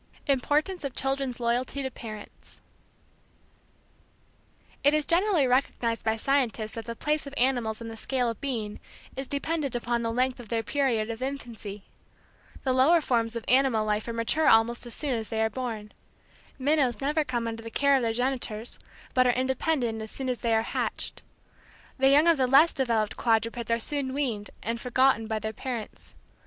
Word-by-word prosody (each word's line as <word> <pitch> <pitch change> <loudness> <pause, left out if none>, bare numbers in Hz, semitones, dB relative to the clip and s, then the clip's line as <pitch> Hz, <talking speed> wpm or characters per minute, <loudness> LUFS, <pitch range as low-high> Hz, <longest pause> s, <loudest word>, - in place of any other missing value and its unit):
IMPORTANCE 295 +6 +1
OF 275 -3 -4
CHILDREN'S 270 -2 -1
LOYALTY 245 +4 -1
TO 265 - -3
PARENTS 215 -3 -10 2.2
It 285 +2 +5
is 305 -1 +1
generally 350 -3 +3
recognized 245 -2 0
by 220 0 +1
scientists 235 -4 0
that 225 -1 -6
the 230 - -5
place 300 +3 -1
of 280 - -8
animals 240 -4 +1
in 230 - -6
the 225 - -7
scale 250 +2 -1
of 230 -2 -4
being 225 -7 -3 0.4
is 270 0 -4
dependent 285 -2 -2
upon 240 0 -1
the 230 0 -1
length 255 +2 0
of 235 -4 -10
their 225 0 0
period 235 -4 0
of 230 +2 -7
infancy. 235 -7 -6 0.8
The 260 - +1
lower 280 +7 +5
forms 235 -6 0
of 230 - -4
animal 255 -4 +3
life 210 +1 -1
are - - -2
mature 230 +7 +1
almost 235 +2 +3
as 235 - -3
soon 290 -4 -1
as 225 -2 -3
they 220 - -2
are 220 0 +1
born. 220 -3 -5 0.7
Minnows 275 -3 +1
never 295 +3 +1
come 240 -4 -2
under 225 0 -5
the 230 - -7
care 280 +4 +3
of 265 - +2
their 230 -1 +1
genitors, 245 -2 -1 0.3
but 255 0 +4
are 245 - +4
independent 255 -2 0
as 220 - -6
soon 265 +2 -3
as 250 - -2
they 230 -1 +1
are 220 - +2
hatched. - - -1 0.8
The 270 0 +5
young 290 +3 +6
of 335 -2 +5
the 260 -1 +2
less 285 +6 +6
developed 230 -5 0
quadrupeds 230 0 0
are 230 - +3
soon 265 +2 -1
weaned 230 -8 -2
and 230 +1 -3
forgotten 250 -2 +2
by 220 -1 -1
their 220 0 -4
parents. 240 -3 -6
245 Hz, 180 wpm, -27 LUFS, 225-275 Hz, 2.2 s, young